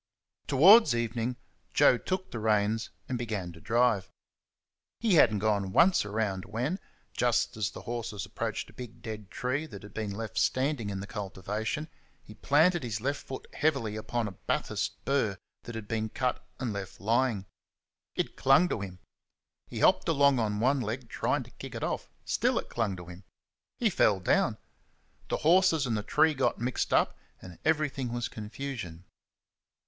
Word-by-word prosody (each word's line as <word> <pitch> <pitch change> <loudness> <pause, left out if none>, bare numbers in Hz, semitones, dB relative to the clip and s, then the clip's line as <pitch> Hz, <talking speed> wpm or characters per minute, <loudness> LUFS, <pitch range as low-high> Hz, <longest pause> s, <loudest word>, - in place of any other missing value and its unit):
Towards 190 - +7
evening 120 +1 -1 0.4
Joe 125 - +6
took 185 0 -3
the 115 - -4
reins 110 +1 +1 0.2
and 125 -2 -2
began 105 -7 -3
to 80 -1 -14
drive. 115 -4 +2 0.9
He 225 -4 +2
had 145 -9 +7
n't 105 -2 -2
gone 100 -3 +1
once 175 - +5
around 105 -3 -2
when, 125 - -2 0.3
just 120 0 +1
as 105 -2 -1
the - - -10
horses 115 -3 -4
approached - - -4
a - - -22
big 120 -2 -10
dead 110 -3 -6
tree 135 +5 -2
that 100 -9 -10
had 100 0 -12
been 110 -2 -3
left 110 +2 -3
standing 130 -5 +1
in 95 -1 -4
the - - -5
cultivation, 105 +8 -4 0.4
he 105 - -12
planted 160 +9 +3
his 115 -4 -3
left 140 +5 -2
foot 135 - -7
heavily 135 -9 0
upon 110 +1 -2
a - - -5
Bathurst 95 - -2
burr 115 -8 +1 0.3
that 120 - -7
had 110 -2 -6
been 110 0 -1
cut 125 +2 -1 0.2
and 120 -4 -2
left 100 -2 -6
lying. 115 -1 +1 0.7
It - - -2
clung 140 +7 +5
to 105 - -2
him. 95 -2 -6 0.7
He - - -5
hopped - - +4
along 140 -4 +4
on 105 -2 0
one 130 +4 +2
leg, 115 +2 -4
trying - - 0
to - - -16
kick - - -9
it - - -4
off; - - -2 0.2
still - - +1
it - - -3
clung 110 -5 -1
to 90 -1 -9
him. 90 +3 -11 0.5
He 225 -4 +2
fell 105 - +3
down. 90 - +2 0.7
The - - 0
horses 170 -3 +5
and 120 -3 0
the 105 - -1
tree 155 +8 +3
got 135 -2 +1
mixed 125 +2 -1
up, - - +3 0.2
and 90 -2 -12
everything 150 -5 0
was 120 0 -2
confusion. 105 -6 -6
115 Hz, 175 wpm, -29 LUFS, 105-135 Hz, 0.9 s, Towards